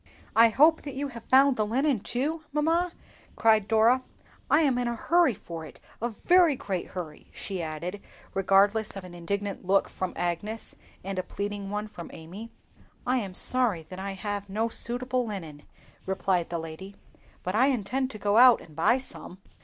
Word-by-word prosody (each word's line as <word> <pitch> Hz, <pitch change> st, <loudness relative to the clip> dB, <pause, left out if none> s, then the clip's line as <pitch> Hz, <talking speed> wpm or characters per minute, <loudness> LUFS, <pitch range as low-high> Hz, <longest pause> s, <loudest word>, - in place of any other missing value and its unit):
"I 230 Hz, +1 st, +7 dB
hope 310 Hz, +7 st, +5 dB
that 280 Hz, -3 st, -7 dB
you 280 Hz, +1 st, -2 dB
have 235 Hz, -3 st, -10 dB
found 270 Hz, 0 st, +6 dB
the 215 Hz, -, +2 dB
linen 255 Hz, +4 st, +1 dB
too, 285 Hz, +10 st, -2 dB
mamma," 330 Hz, +4 st, +1 dB, 0.4 s
cried 220 Hz, -2 st, +4 dB
Dora; 225 Hz, +4 st, +4 dB, 0.5 s
"I 300 Hz, -, +5 dB
am 270 Hz, -5 st, +2 dB
in 245 Hz, -, 0 dB
a 235 Hz, -, -1 dB
hurry 330 Hz, 0 st, +3 dB
for 165 Hz, -3 st, -8 dB
it, 155 Hz, -, -12 dB, 0.2 s
a 235 Hz, -, 0 dB
very 340 Hz, -, +4 dB
great 195 Hz, -7 st, -4 dB
hurry," 165 Hz, -5 st, -8 dB
she 190 Hz, -3 st, -5 dB
added, 170 Hz, +5 st, -5 dB, 0.3 s
regardless 200 Hz, +3 st, +3 dB
of 195 Hz, -, -6 dB
an 180 Hz, -1 st, -10 dB
indignant 200 Hz, +4 st, -3 dB
look 195 Hz, +2 st, +3 dB
from 185 Hz, -1 st, -4 dB
Agnes, 175 Hz, +6 st, -3 dB, 0.3 s
and 195 Hz, 0 st, -3 dB
a -, -, +2 dB
pleading 200 Hz, +1 st, -5 dB
one 210 Hz, +1 st, -3 dB
from 205 Hz, -5 st, -9 dB
Amy. 185 Hz, +8 st, -9 dB, 0.5 s
"I 255 Hz, +1 st, +2 dB
am 195 Hz, -6 st, -4 dB
sorry 235 Hz, -10 st, +1 dB
that 185 Hz, -, -7 dB
I 195 Hz, 0 st, -4 dB
have 205 Hz, 0 st, -4 dB
no 220 Hz, +4 st, 0 dB
suitable 250 Hz, +1 st, -2 dB
linen," 165 Hz, -8 st, -6 dB, 0.5 s
replied 190 Hz, -2 st, 0 dB
the 170 Hz, -, -2 dB
lady, 165 Hz, +5 st, -8 dB, 0.5 s
"but 185 Hz, -, -2 dB
I 245 Hz, +5 st, +4 dB
intend 260 Hz, +1 st, 0 dB
to 220 Hz, -, -8 dB
go 205 Hz, 0 st, +1 dB
out 250 Hz, 0 st, +8 dB
and 155 Hz, -, -15 dB
buy 210 Hz, -, +4 dB
some." 255 Hz, -8 st, -8 dB
210 Hz, 180 wpm, -27 LUFS, 190-255 Hz, 0.5 s, out